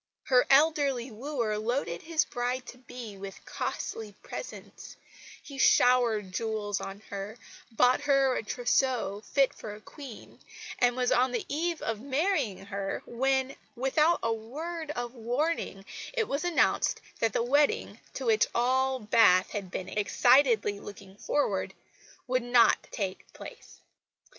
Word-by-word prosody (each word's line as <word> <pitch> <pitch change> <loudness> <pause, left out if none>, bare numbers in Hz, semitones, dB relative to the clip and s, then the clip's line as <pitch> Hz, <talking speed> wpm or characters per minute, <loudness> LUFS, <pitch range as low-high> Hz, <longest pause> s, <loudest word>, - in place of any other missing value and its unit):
Her 250 -2 +3
elderly 275 -4 +3
wooer 230 -3 -2
loaded 220 -6 -2
his 320 -1 +1
bride 250 0 -3
to 245 - -12
be 245 -5 -9
with 195 0 -9
costly 215 -2 -4
presents; - - -9 0.5
he 275 -2 -9
showered 240 -7 +4
jewels 210 0 -2
on 195 +1 -7
her, 200 +3 -5 0.3
bought 250 +3 +3
her 275 -2 +3
a - - -1
trousseau 240 -2 0
fit 275 +2 +2
for 210 -1 -8
a - - -12
Queen; 260 +1 -12 0.4
and 245 -1 +3
was 250 -1 0
on 255 +1 +3
the 240 - -2
eve 335 +3 -2
of 220 -1 -3
marrying 280 - 0
her, 195 0 -4
when 265 +2 0 0.2
without 300 +7 +2
a 230 - +1
word 310 +9 -6
of 245 -4 -4
warning, 245 -3 -2 0.3
it 460 -4 0
was 280 +4 -2
announced 350 -2 +2 0.2
that 225 -2 +1
the - - +1
wedding, 290 - +1 0.2
to - - -4
which 445 -2 +3
all 260 +2 +2
Bath 210 -4 +4
had 200 -3 -4
been 185 0 -5
excitedly 220 0 +3
looking 200 -1 -11
forward, 290 +7 -1 0.5
would 255 0 +1
not 245 0 +4
take 195 -4 -4
place! - - -12
245 Hz, 140 wpm, -29 LUFS, 215-275 Hz, 0.5 s, showered